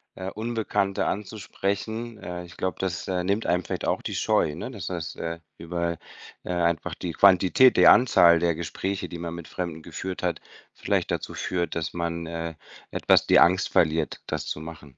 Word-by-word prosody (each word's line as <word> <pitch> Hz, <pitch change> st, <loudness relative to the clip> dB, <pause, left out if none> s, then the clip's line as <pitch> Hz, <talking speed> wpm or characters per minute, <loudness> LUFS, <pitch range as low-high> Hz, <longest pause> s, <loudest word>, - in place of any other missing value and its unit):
äh, 95 Hz, 0 st, -5 dB
Unbekannte 110 Hz, -3 st, -1 dB
anzusprechen. 110 Hz, +2 st, -3 dB
Äh, 90 Hz, -2 st, -6 dB
ich 85 Hz, -, -14 dB
glaube, 95 Hz, -3 st, -2 dB
das, 90 Hz, -3 st, -3 dB
äh, 90 Hz, -1 st, 0 dB
nimmt 100 Hz, +4 st, 0 dB
einem 90 Hz, 0 st, +1 dB
vielleicht -, -, -4 dB
auch -, -, 0 dB
die -, -, -4 dB
Scheu, 75 Hz, -, +1 dB
ne, 85 Hz, -, -6 dB
dass 100 Hz, -9 st, -7 dB
das, 85 Hz, -4 st, -4 dB
äh, 85 Hz, 0 st, -4 dB, 0.2 s
über 85 Hz, 0 st, -3 dB, 0.5 s
äh, -, -, -8 dB
einfach 85 Hz, -2 st, 0 dB
die 90 Hz, -, -4 dB
Quantität, 95 Hz, +8 st, +5 dB
die -, -, +6 dB
Anzahl 85 Hz, -9 st, +7 dB
der 85 Hz, -1 st, +1 dB
Gespräche, 95 Hz, +4 st, -4 dB
die 85 Hz, -, -7 dB
man 85 Hz, 0 st, -5 dB
mit 85 Hz, -1 st, -9 dB
Fremden 85 Hz, -3 st, -5 dB
geführt 90 Hz, +3 st, -6 dB
hat, -, -, 0 dB, 0.3 s
vielleicht -, -, -1 dB
dazu -, -, -3 dB
führt, 85 Hz, -1 st, -2 dB
dass 80 Hz, -2 st, -3 dB
man, 85 Hz, -1 st, -3 dB
äh, 85 Hz, 0 st, -5 dB, 0.4 s
etwas -, -, +3 dB
die -, -, +6 dB
Angst 90 Hz, +2 st, +4 dB
verliert, 80 Hz, 0 st, +1 dB
das -, -, -3 dB
zu 75 Hz, -, -4 dB
machen. 75 Hz, -4 st, -11 dB
85 Hz, 185 wpm, -26 LUFS, 85-95 Hz, 0.5 s, Anzahl